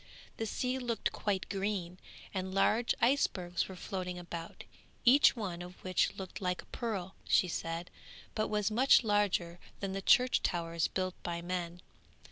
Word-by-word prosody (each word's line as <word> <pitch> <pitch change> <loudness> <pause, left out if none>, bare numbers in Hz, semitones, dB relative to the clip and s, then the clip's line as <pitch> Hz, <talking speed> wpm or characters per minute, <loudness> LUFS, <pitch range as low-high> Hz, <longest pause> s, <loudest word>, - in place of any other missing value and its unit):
The 225 - -2
sea 250 +4 -1
looked 240 -3 -1
quite 200 -3 -1
green, 195 -3 -2 0.3
and 190 -1 -3
large 220 +4 +3
icebergs 185 -9 +1
were 190 - -7
floating 180 -1 -4
about, 170 -1 -7 0.4
each 260 +3 +7
one 185 -7 -4
of 180 +1 -8
which 185 -1 +1
looked 190 0 -7
like 180 -1 -1
a - - -23
pearl, 195 -6 -4
she 185 - +4
said, 165 0 -4 0.4
but 215 - 0
was 210 0 0
much 250 +4 +6
bigger 200 -5 +1 0.2
than 195 -1 -3
the 195 - -3
church 250 +5 +5
towers 170 -2 0
built 185 -1 -2
by 170 -1 -4
men. 175 -1 -3
190 Hz, 155 wpm, -33 LUFS, 175-215 Hz, 0.4 s, each